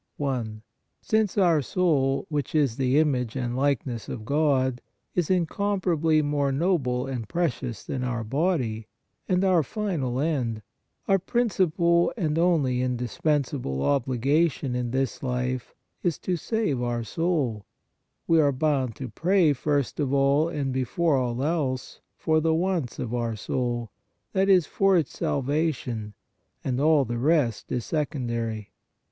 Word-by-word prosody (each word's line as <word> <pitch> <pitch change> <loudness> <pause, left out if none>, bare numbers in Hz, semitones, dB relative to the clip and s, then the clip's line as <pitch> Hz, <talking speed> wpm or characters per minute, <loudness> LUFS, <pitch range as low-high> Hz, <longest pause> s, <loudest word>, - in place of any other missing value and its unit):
i. 135 -4 0 0.6
Since 215 -3 +1
our 170 -6 +4
soul, 140 -3 +1
which 150 0 -2
is? 140 -7 +2
.the 130 0 +2
image 130 -7 +1
and 120 -2 -2
i% - - -4
likeness 130 -4 -1
of 110 - -6
God, 135 -3 +1 0.3
is 175 -4 0
incomparably 175 -3 +1
more 145 -1 0
noble 135 -5 0
and 125 -6 -5
precious 135 -8 -2
than 130 -2 -4
our 120 -2 -2
body, 125 - -1 0.4
and 185 0 +2
our 185 -3 +4
final 150 - -2
end, 125 -8 -1 0.4
our 195 0 +4
prin 240 +6 0
cipal 170 -2 +2
and 160 -5 0
only 150 -8 +2
indispensable 125 - -1
obligation 140 +2 +1
in 125 -1 -1
this 130 +1 -1
life 125 -1 -2 0.3
is 175 -4 0
to 180 - -2
save 190 - -1
our 120 -1 -1
soul, 135 - -1 0.6
we 165 -1 +4
are 145 -1 +3
bound 135 -4 0
to 130 - -6
pray, 175 +1 +2
first 145 0 -1
of 140 -3 0
all 140 +3 +3
and 140 -5 -2
before 140 +5 +1
all 125 -1 -1
else, 140 -5 -2 0.2
for 155 0 +2
the 160 0 +2
wants 170 -7 -1
of 120 -1 -4
our 115 -2 -1
soul, 120 +1 -2 0.4
that 195 +1 +2
is, 185 -4 +5
for 195 +3 +3
its 160 -5 -1
salvation, 130 -7 -1 0.5
and 130 0 -1
all 150 -2 +4
the 120 0 -3
rest 140 -5 +1
is 120 -3 -2
second 145 -6 -2
ary. 115 -3 -3
140 Hz, 145 wpm, -26 LUFS, 125-165 Hz, 0.6 s, is